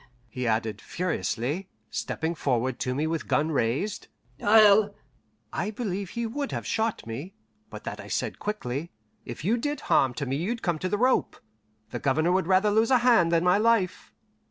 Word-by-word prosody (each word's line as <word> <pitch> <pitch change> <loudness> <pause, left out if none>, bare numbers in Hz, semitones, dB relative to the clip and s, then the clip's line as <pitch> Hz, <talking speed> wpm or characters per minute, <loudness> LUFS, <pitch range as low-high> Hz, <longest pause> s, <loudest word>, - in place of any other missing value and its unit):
he 125 +2 -3
added 110 -1 -1
furiously, 170 -1 -2 0.2
stepping 160 +1 -2
forward 130 -5 -1
to 125 0 -1
me 150 +3 0
with 160 -1 -2
gun 155 +2 +1
raised, 140 - -1 0.4
"I'll 205 -1 +6 0.3
" - - -42
I 210 - -1
believe 200 -4 -3
he 235 +3 -3
would 280 +5 -3
have - - -4
shot 225 0 -1
me, 135 +12 -7 0.3
but - - -9
that - - -5
I - - -9
said - - -2
quickly, 165 -7 -3 0.4
"If 120 +6 -7
you 225 +5 +2
did 290 +5 -2
harm 130 -2 +2
to 140 - -3
me 135 +1 -1
you'd 225 +9 -3
come 170 -4 0
to 185 - -2
the 205 - 0
rope. 255 +4 +2 0.5
The - - -4
Governor 155 +5 +2
would 185 -2 +1
rather 190 +2 +4
lose 220 +2 +3
a 260 - +6
hand 225 -9 +5
than 165 0 +3
my 180 +3 +4
life." 220 -5 +1
180 Hz, 185 wpm, -27 LUFS, 140-215 Hz, 0.5 s, I'll